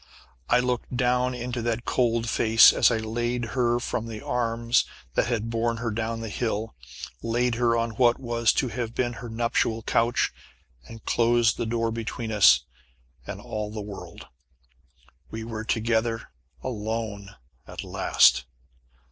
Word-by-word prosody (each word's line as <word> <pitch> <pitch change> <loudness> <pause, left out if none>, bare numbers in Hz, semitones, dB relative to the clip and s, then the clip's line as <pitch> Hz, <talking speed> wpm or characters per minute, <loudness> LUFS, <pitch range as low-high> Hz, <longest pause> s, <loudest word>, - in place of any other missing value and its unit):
I - - +5
looked 125 0 -2
down 125 0 +1
into 125 0 -4
that 120 +1 -2
cold 115 -2 +1
face 110 0 +6
as - - +5
I 115 - +1
laid 120 +2 -2
her 120 -2 +2
from 115 -1 -3
the 110 -2 -6
arms 115 0 +1 0.3
that - - +1
had 115 -2 -2
borne 115 0 0
her 115 0 -2
down 115 +1 -3
the 115 - -5
hill 110 0 -2 0.5
laid 120 +1 0
her 115 0 +2
on 115 0 -1
what 120 +1 +3
was 120 -3 +1
to 130 - 0
have 120 -1 -4
been 120 -1 0
her 120 - -7
nuptial 115 0 0
couch 120 +3 +1 0.5
and 115 -1 -12
closed 120 0 +3
the 115 - -2
door 115 0 0
between 115 0 -4
us 105 -3 +6 0.7
and - - -6
all 105 -1 -4
the 110 - -6
world. 100 -1 -9 1.0
We 110 0 -6
were 110 -1 -5
together 115 0 0 0.3
alone 110 -4 -4 0.3
at - - -7
last! - - +3
115 Hz, 150 wpm, -26 LUFS, 110-120 Hz, 1.0 s, face